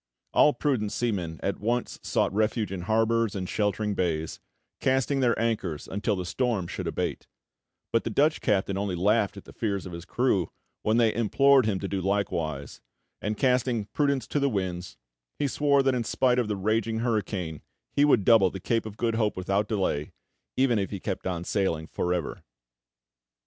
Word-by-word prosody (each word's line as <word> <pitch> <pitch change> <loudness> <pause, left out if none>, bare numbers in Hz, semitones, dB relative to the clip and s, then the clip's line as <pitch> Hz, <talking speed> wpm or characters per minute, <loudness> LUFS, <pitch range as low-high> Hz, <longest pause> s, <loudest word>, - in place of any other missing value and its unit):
All 150 - +6
prudent 120 -8 0
seamen 90 -9 -2
at 100 - -1
once 120 +3 -1
sought - - 0
refuge 110 +1 0
in 95 -2 -4
harbours 115 0 +2
and 95 -2 -3
sheltering 105 +1 0
bays, 80 -4 -2 0.4
casting 135 +1 +1
their 120 -3 +2
anchors 105 -9 -1
until 105 +2 -1
the 90 -1 -4
storm 115 -1 0
should - - -5
abate; - - -3 0.7
but 115 - +3
the - - -2
Dutch 150 +7 +2
captain 100 -1 +1
only 100 -2 -1
laughed 100 +3 +2
at - - -9
the - - -13
fears 100 -4 -2
of 90 - -7
his 85 0 -7
crew 100 -4 +1 0.3
when 110 +2 +2
they 115 -2 +4
implored 130 +2 +4
him 100 -3 0
to 100 - -2
do 95 0 -2
likewise, 85 -7 -2 0.4
and, 105 +1 -2
casting 125 -4 +1
prudence 140 -3 +1
to 145 - 0
the 140 0 +2
winds, 95 -4 -3 0.4
he 145 - 0
swore 140 0 +3
that 135 -1 +2
in 125 -2 0
spite 125 +2 +2
of 120 - 0
the 105 - -1
raging 110 +3 0
hurricane 100 -9 -2 0.3
he 145 - +3
would 130 -9 +4
double 110 -5 +6
the 95 - -7
Cape 115 +4 -1
of 105 0 -9
Good 115 0 0
Hope 110 -3 0
without 100 +3 0
delay, 95 -8 -1 0.4
even 130 -4 +3
if 100 - -2
he 100 - -5
kept 95 0 -4
on 90 -2 -2
sailing 90 -5 0
for 90 +2 -2
ever. 90 -4 -2
105 Hz, 185 wpm, -27 LUFS, 95-120 Hz, 0.7 s, All